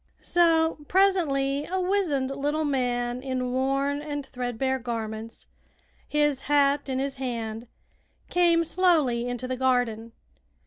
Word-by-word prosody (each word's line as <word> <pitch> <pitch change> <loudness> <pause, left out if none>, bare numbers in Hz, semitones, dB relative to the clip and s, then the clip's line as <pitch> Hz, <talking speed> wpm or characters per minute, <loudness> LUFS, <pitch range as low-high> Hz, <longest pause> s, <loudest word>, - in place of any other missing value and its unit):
So 330 -2 +3
presently 295 -8 +2
a 375 +2 -1
wizened 360 -9 0
little 290 +3 -1
man 245 -3 -1
in 255 -2 -2
worn 275 +2 0
and 290 -2 -5
threadbare 255 0 -2
garments, 225 -2 -5 0.6
his 295 -2 +1
hat 285 -1 +3
in 260 - -1
his 270 0 -2
hand, 230 -3 -4 0.6
came 340 -1 +3
slowly 310 -10 +2
into 245 0 -4
the 255 0 -3
garden. 245 -3 0
270 Hz, 120 wpm, -26 LUFS, 245-300 Hz, 0.6 s, So